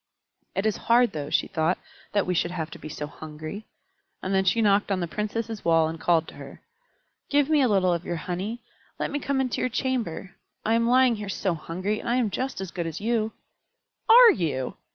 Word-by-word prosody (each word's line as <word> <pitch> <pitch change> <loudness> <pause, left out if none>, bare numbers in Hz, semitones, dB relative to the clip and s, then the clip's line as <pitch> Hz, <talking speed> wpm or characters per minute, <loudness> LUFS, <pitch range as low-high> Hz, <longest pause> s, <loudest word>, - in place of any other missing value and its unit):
"It 195 - -1
is 215 - +1
hard, 240 +1 +5
though," 145 -2 -5
she - - +2
thought, 160 +3 0 0.3
"that 205 -1 +1
we 180 - 0
should 175 0 +1
have 165 -3 -4
to - - -9
be 155 - -8
so 150 -1 -5
hungry." 155 +7 -8 0.6
And 190 - -2
then 190 0 +3
she 190 +5 +3
knocked 205 -1 +3
on 190 - +1
the 175 - -2
Princess' 215 +3 -4
wall 165 -1 +4
and 160 +1 -5
called 165 -2 +2
to - - -13
her, - - -10 0.7
"Give 290 +1 +2
me 300 -2 +5
a 260 - +4
little 190 -4 +3
of 170 0 -2
your 175 - -3
honey. 185 +8 -4 0.3
Let - - -2
me 290 - -1
come 280 -1 -1
into 255 -2 -1
your 255 - +1
chamber. 235 -8 -2 0.3
I 225 - +2
am 230 +1 +2
lying 255 -2 +4
here 210 -1 -6
so 190 -1 -1
hungry, 185 +6 -3
and - - -5
I 240 - +2
am 240 -5 +1
just 260 +3 -3
as 190 -2 -5
good 170 -2 -3
as 165 0 -5
you." 220 0 0 0.8
"Are 475 0 +10
you? 145 - -2
200 Hz, 220 wpm, -26 LUFS, 170-235 Hz, 0.8 s, Are